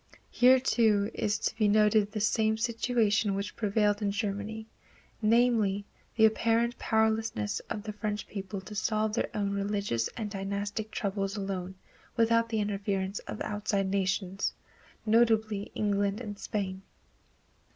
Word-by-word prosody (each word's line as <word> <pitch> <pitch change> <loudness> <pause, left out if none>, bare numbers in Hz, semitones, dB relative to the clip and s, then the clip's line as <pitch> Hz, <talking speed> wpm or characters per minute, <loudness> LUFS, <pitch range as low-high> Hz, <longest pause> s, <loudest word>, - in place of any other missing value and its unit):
Here, 255 +1 +6
too, 220 -5 +2
is 210 0 0
to - - -2
be 215 -2 +3
noted 210 0 +4
the 215 - -3
same 220 +1 +2
situation 225 -3 +1
which 200 +1 -4
prevailed 210 -1 +1
in 205 - +1
Germany, 205 +2 -3 0.6
namely, 220 -3 +3 0.3
the 220 - +6
apparent 230 +2 +2
powerlessness 220 - 0
of 210 - -4
the 215 -1 -5
French 210 0 -3
people 195 -1 -6
to 200 +3 -10
solve 215 0 0
their 230 - 0
own 200 -1 0
religious 200 - -1
and 215 -3 -4
dynastic 200 +2 -3
troubles 195 -1 -2
alone 190 -2 -4 0.4
without 230 0 +3
the 220 -1 0
interference 200 -1 -2
of - - -6
outside 205 -2 -1
nations, 195 0 -1 0.5
notably 220 -2 +2
England 200 0 0
and 205 -4 -7
Spain. 190 -2 -3
210 Hz, 135 wpm, -29 LUFS, 200-220 Hz, 0.6 s, Here